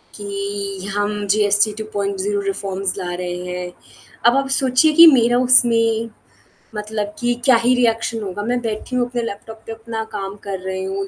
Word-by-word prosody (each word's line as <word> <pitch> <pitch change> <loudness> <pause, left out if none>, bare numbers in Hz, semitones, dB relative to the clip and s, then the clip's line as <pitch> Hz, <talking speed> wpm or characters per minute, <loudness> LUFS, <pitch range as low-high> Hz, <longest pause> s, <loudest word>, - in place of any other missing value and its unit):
कि 200 -1 -5
हम 205 0 -1
GST 205 +1 +2
2.0 200 -1 -2
reforms 195 -1 -3
ला 175 -1 -4
रहे 175 0 -4
हैं। 180 0 -5 0.5
अब 240 +3 +5
आप 275 0 0
सोचिए 265 +4 +3
कि 335 +2 +9
मेरा 240 -5 +5
उसमें 230 -2 +3 0.7
मतलब 210 0 -4
कि 240 0 +1
क्या 260 - +6
ही 250 +1 +4
रिएक्शन 230 -2 0
होगा 200 +1 -5
मैं 245 +3 -1
बैठी 225 +2 -4
हूँ 245 -1 +1
अपने 245 -1 -2
लैपटॉप 220 0 -8
पे - - -5
अपना 225 0 -5
काम 195 -1 -5
कर 195 -2 -4
रही 190 0 -3
हूँ 195 +1 -4
210 Hz, 170 wpm, -19 LUFS, 195-235 Hz, 0.7 s, कि